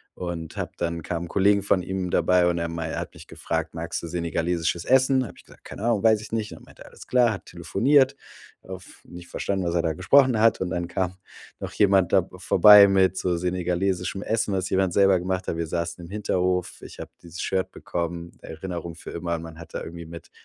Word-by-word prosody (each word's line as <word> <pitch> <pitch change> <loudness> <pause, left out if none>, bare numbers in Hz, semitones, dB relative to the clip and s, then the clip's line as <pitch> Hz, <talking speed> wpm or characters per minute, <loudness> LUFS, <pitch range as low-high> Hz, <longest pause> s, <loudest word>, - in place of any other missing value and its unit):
und 85 -3 -6
habe - - -3
dann 85 -1 -3
kamen 85 +1 -4
Kollegen 100 +3 +3
von 95 -2 +1
ihm 95 0 -3
dabei 90 0 +3
und 85 -1 0
er 85 0 -1
mei 85 -1 -4
er - - -3
hat - - -8
mich - - -14
gefragt: - - -4
„Magst 85 +1 -4
du 85 - -6
senegalesisches 85 0 -1
Essen?“ 130 0 +4
Habe 90 - -13
ich - - -16
gesagt: - - -19
„Keine - - -8
Ahnung, 115 -3 +1
weiß 110 -1 +5
ich 110 - -11
nicht.“ 110 -2 -2
Und - - -11
dann - - -16
meinte - - -18
er: - - -15
„Alles - - -14
klar.“ 125 -2 +3
Hat 100 - -6
telefoniert, 130 - +2 0.5
oft 95 0 -11
nicht 90 0 -11
verstanden, 95 0 -2
was 85 0 -1
er 85 - +1
da 80 -2 0
gesprochen 125 - +4
hat. 115 0 +4
Und 90 - -2
dann 85 0 -2
kam 95 +1 -3 0.4
noch - - -6
jemand 95 -3 +3
da - - +6
b - - -13
vorbei 105 -1 +8
mit 95 -1 +3
so 90 -2 0
senegalesischem 90 +1 -1
Essen, 110 -2 -1
was 95 0 -1
jemand 95 -2 +1
selber 95 -1 +4
gemacht 90 +1 -3
hat. 80 - -2
Wir 85 -1 -2
saßen 85 +1 -4
im 85 - -10
Hinterhof. 90 -3 -1
Ich - - -12
habe - - -8
dieses 85 +2 -8
Shirt 95 -1 -1
bekommen. 85 0 -5
Erinnerung 85 0 -7
für 85 - -10
immer 85 0 -3
und 80 - -6
man 80 -1 -10
hat 85 - -12
da - - -3
irgendwie 85 0 -9
mit 85 +1 -11
90 Hz, 230 wpm, -24 LUFS, 85-100 Hz, 0.5 s, vorbei